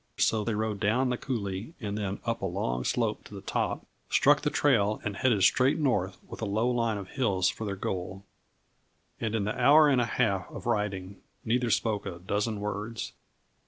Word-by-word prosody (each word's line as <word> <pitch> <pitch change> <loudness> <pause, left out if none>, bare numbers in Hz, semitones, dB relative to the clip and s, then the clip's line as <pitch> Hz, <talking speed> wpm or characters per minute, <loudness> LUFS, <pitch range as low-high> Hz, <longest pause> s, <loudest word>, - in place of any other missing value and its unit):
So 110 -2 +2
they 110 0 -1
rode 110 -1 -2
down 115 +5 +2
the - - +1
coulée 105 - -4
and 105 -4 -4
then 100 -2 -3
up 115 -1 -1
a - - -1
long 75 -10 -2
slope - - 0
to - - -11
the - - -7
top, - - -2 0.2
struck 145 +1 +4
the 150 - +1
trail 110 -9 +2
and 105 -1 -3
headed 110 -4 +2
straight 130 +7 +4
north 105 - 0
with - - -9
a - - 0
low 110 +4 +1
line 115 -3 0
of 95 -2 -7
hills 100 -9 +1
for 110 - -6
their 100 -1 -2
goal. 95 +1 -4 0.9
And 110 -1 -1
in 110 - 0
the 105 - -2
hour 145 +5 +6
and 130 -3 +3
a - - +2
half 110 - 0
of - - -9
riding, 100 -2 -2 0.2
neither 120 +1 +1
spoke 110 -2 0
a 85 - -5
dozen 100 +4 -2
words. 105 +2 -4
105 Hz, 195 wpm, -29 LUFS, 100-120 Hz, 0.9 s, hour